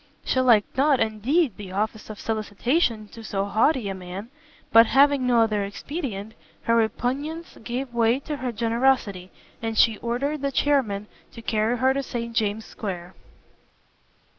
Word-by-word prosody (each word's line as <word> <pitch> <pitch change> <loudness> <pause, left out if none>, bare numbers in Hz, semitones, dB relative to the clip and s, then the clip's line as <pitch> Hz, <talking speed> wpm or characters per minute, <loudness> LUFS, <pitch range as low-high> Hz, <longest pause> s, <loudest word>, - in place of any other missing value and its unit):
She 260 - +1
liked 235 -5 +4
not, 275 0 +3
indeed, 225 - +1
the 190 -3 -8
office 215 +2 -2
of 215 - -8
solicitation 220 - 0
to 225 - -11
so 200 -2 -2
haughty 220 +3 +2
a 195 - -2
man, 190 +5 -8 0.4
but, 230 0 +8
having 275 -1 +4
no 240 -2 +4
other 215 -2 +1
expedient, 215 - -5 0.3
her 230 - +2
repugnance 265 +9 -1
gave 245 +2 -4
way 235 +2 +3
to 295 0 -4
her 255 -2 -3
generosity, 230 -5 +1 0.3
and 225 -1 -3
she 225 -2 +5
ordered 275 +5 -2
the 280 0 -1
chairmen 250 -9 +1 0.3
to 230 - -10
carry 220 +2 +1
her 260 +2 +3
to 275 - -1
St 235 -3 -5
James's 215 -1 0
Square. 180 -4 -6
230 Hz, 155 wpm, -24 LUFS, 210-265 Hz, 0.4 s, but